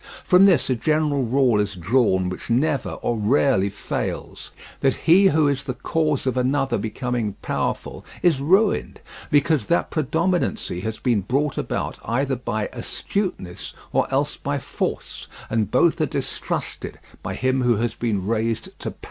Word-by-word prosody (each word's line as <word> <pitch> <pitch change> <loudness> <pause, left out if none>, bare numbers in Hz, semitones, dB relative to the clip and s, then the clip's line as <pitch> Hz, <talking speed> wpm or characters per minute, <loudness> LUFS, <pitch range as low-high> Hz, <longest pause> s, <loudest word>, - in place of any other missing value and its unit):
From 185 +1 +6
this 180 -8 +4
a 130 - +2
general 150 +3 +1
rule 125 -2 +3
is 105 -1 -1
drawn 95 0 +2
which 90 +5 -6
never 140 +4 +1
or 120 -2 0
rarely 105 -2 +3
fails: 100 - -5 0.3
that 135 - +2
he 185 +4 +7
who 155 -4 +3
is 140 -1 -1
the 125 - -3
cause 155 +1 0
of 130 -2 0
another 130 0 +1
becoming 120 -2 -2
powerful - - -3 0.2
is 160 -6 +3
ruined; 195 +8 +2 0.3
because 145 -4 +2
that 170 - +1
predominancy 160 - 0
has 110 +3 -4
been 120 -6 +1
brought 135 +8 0
about - - -3
either 135 +3 0
by 110 -4 -2
astuteness 120 - -4 0.2
or - - +1
else - - 0
by - - -2
force, - - -4 0.2
and 110 -3 +1
both - - +3
are - - +2
distrusted - - -4 0.2
by - - -4
him 130 0 +1
who 120 -1 +3
has 115 +1 -1
been 105 -6 -2
raised 115 +1 -1
to - - -4
power. - - -12
130 Hz, 155 wpm, -23 LUFS, 110-150 Hz, 0.3 s, he